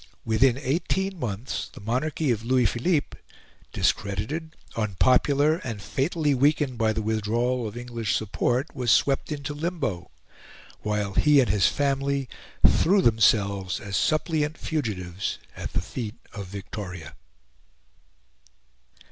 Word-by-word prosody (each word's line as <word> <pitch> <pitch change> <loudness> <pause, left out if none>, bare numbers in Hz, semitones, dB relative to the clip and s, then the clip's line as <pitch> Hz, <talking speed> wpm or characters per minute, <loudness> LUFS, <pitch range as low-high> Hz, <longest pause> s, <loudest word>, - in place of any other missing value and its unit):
Within 115 +3 +3
eighteen 180 +7 -1
months 115 -1 -3
the - - -12
monarchy 130 +6 -1
of 110 -2 -1
Louis 125 +1 +2
Philippe, 145 +7 0 0.5
discredited, 105 - -1 0.2
unpopular, 130 - +3
and 115 - -5
fatally 145 - 0
weakened 140 -1 +2
by 110 -1 +3
the 110 0 -2
withdrawal 115 +3 0
of 105 +2 -8
English 120 -3 -2
support, 120 +7 -1
was 125 -3 -1
swept 135 +6 +3
into 145 0 -4
limbo, 145 - -3 0.7
while 105 -2 -2
he 150 +6 +5
and 130 - +3
his 100 -4 +4
family 140 -1 0 0.4
threw 195 +3 +3
themselves 100 -4 +3
as 100 -3 -5
suppliant 155 - +1
fugitives 100 - -3 0.2
at - - -6
the - - +1
feet 115 -3 -5 0.2
of 100 -4 -6
Victoria. 90 -4 -7
120 Hz, 120 wpm, -26 LUFS, 105-145 Hz, 0.7 s, he